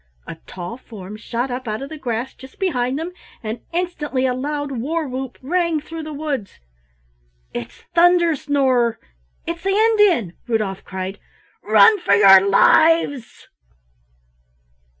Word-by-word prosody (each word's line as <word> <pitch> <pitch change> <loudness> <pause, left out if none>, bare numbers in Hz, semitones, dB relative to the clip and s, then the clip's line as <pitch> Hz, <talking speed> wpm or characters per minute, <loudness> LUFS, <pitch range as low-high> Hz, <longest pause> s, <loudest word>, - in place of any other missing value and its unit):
A 165 - -8
tall 190 +6 -7
form 210 -5 -10
shot 235 +3 -4
up 250 0 -5
out 215 +4 -3
of 275 - -7
the 315 - -8
grass 240 -1 -3
just 265 0 -15
behind 265 -9 -1
them, 330 +3 -4 0.3
and 220 +1 -5
instantly 325 -7 -2
a 255 - +1
loud 290 +2 -3
war 295 +6 -2
whoop 260 0 -6
rang 335 +2 0
through 325 +2 -8
the 310 0 -7
woods. 285 -8 -4 0.9
"It's 115 -1 -7
Thunder 345 -1 +4
snorer 260 -5 +1 0.5
it's 335 0 -4
the 390 - -2
Indian," 410 - +3
Rudolf 215 -5 -2
cried. 190 +1 -6 0.4
"Run 435 -2 +5
for 200 -12 +3
your 195 -2 +8
lives!" 285 +4 +3
265 Hz, 135 wpm, -20 LUFS, 225-330 Hz, 0.9 s, your